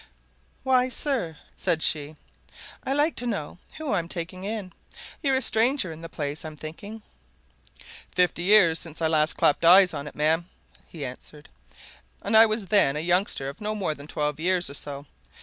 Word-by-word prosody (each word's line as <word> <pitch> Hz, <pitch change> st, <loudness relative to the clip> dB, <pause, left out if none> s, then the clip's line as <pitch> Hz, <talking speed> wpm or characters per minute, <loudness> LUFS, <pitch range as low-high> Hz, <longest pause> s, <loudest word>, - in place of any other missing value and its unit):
"Why, 255 Hz, -1 st, +3 dB
sir," 245 Hz, -, -2 dB, 0.2 s
said 160 Hz, -1 st, -1 dB
she. 150 Hz, 0 st, -1 dB, 0.7 s
"I -, -, -3 dB
like 295 Hz, +4 st, +2 dB
to 245 Hz, -, -4 dB
know 185 Hz, -7 st, -4 dB, 0.2 s
who 310 Hz, -6 st, -3 dB
I'm 170 Hz, -4 st, -1 dB
taking 180 Hz, +2 st, -6 dB
in. 205 Hz, -3 st, -5 dB, 0.5 s
You're 275 Hz, -3 st, +1 dB
a 260 Hz, -, +1 dB
stranger 230 Hz, -, +3 dB
in 160 Hz, 0 st, -10 dB
the 165 Hz, -, -8 dB
place, 145 Hz, -1 st, -5 dB
I'm 155 Hz, -1 st, -8 dB
thinking." 200 Hz, +9 st, -9 dB, 1.1 s
"Fifty 180 Hz, -2 st, +2 dB
years 180 Hz, -4 st, +5 dB
since 165 Hz, -2 st, -7 dB
I 165 Hz, -, 0 dB
last 155 Hz, 0 st, +2 dB
clapped 145 Hz, -, +2 dB
eyes 180 Hz, +2 st, +7 dB
on 140 Hz, -, -5 dB
it, -, -, -10 dB
ma'am," 160 Hz, +4 st, +1 dB, 0.4 s
he 155 Hz, -5 st, -7 dB
answered. 145 Hz, +4 st, -10 dB, 0.7 s
"And -, -, 0 dB
I 225 Hz, +1 st, +8 dB
was 215 Hz, -1 st, -2 dB
then 190 Hz, -9 st, +3 dB
a -, -, -2 dB
youngster 175 Hz, -4 st, 0 dB
of 140 Hz, +7 st, -8 dB
no 210 Hz, +1 st, -2 dB
more 190 Hz, -7 st, -1 dB
than 145 Hz, 0 st, -11 dB
twelve 150 Hz, -1 st, -2 dB
years 180 Hz, -2 st, 0 dB
or -, -, -9 dB
so. 140 Hz, 0 st, -5 dB
175 Hz, 180 wpm, -25 LUFS, 155-215 Hz, 1.1 s, I